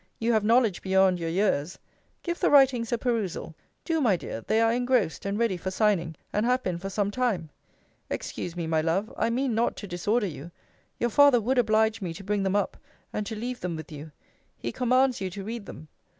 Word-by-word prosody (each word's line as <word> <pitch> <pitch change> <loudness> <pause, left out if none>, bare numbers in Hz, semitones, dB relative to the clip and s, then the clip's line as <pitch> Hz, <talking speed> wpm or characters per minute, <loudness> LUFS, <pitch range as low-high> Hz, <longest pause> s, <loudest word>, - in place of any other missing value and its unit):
You 230 +1 +1
have 215 -2 +2
knowledge 225 -3 +3
beyond 190 -1 +3
your 165 -1 -2
years 180 -2 0 0.5
give 345 -1 -3
the - - +3
writings 260 -5 +4
a 240 - +2
perusal: 225 -9 -2 0.3
do, 325 -2 0
my 225 -8 +4
dear: 115 - -6
they 220 - +1
are 225 0 +3
engrossed, 245 -8 0
and 200 +1 -1
ready 225 -5 +1
for 185 +2 -4
signing, 190 -5 +1 0.2
and 210 - +1
have 250 +2 +1
been 180 -2 -2
for 195 +2 -5
some 200 0 -1
time. 205 -11 -1 0.6
Excuse 175 - -5
me, 170 -2 -3
my 160 -1 +1
love 180 +7 -1
I - - 0
mean 250 +1 0
not 230 +2 +1
to 205 - -7
disorder 205 +6 0
you: 165 -3 -7 0.5
your 240 0 0
father 285 -1 +6
would 250 +4 +1
oblige 220 -1 +2
me 170 -3 -4
to 195 - -9
bring 205 +1 -1
them 195 0 0
up, 205 - 0 0.4
and 210 -1 -3
to 220 - -4
leave 245 +3 -4
them 180 -2 -3
with 160 0 -8
you. 150 +1 -9 0.5
He 120 - -4
commands 255 - +2
you 190 - -2
to 195 +2 -7
read 225 +1 -6
them. 155 - -10
210 Hz, 215 wpm, -27 LUFS, 180-235 Hz, 0.6 s, father